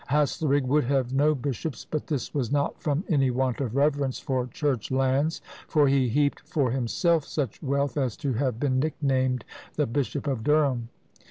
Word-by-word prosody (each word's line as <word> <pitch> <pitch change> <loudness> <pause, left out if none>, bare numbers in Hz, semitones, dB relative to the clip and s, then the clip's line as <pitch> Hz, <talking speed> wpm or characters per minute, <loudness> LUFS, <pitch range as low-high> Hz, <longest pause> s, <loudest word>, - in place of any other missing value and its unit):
Haslerigg 145 0 +2
would 145 +2 +2
have 130 -1 0
no 150 +3 +3
bishops, 140 0 -4
but 155 - -4
this 145 -5 -3
was 135 -4 -1
not 145 0 0
from 150 +2 0
any 135 -6 +3
want 130 +1 0
of 125 -3 -3
reverence 140 -2 +1
for 130 -2 -2
church 130 -2 -2
lands, 135 +4 +1 0.2
for 150 -3 +3
he 135 -2 +3
heaped 145 +4 +1
for 135 -6 -1
himself 140 +6 +1
such 140 -7 -3
wealth 140 0 -1
as 130 -6 -1
to 140 -2 -1
have 125 -1 -1
been 130 -2 +1
nicknamed 130 -4 0 0.3
"the - - +2
Bishop 140 +4 -2
of 130 -6 -2
Durham!" 140 -5 +2
135 Hz, 175 wpm, -26 LUFS, 130-145 Hz, 0.3 s, no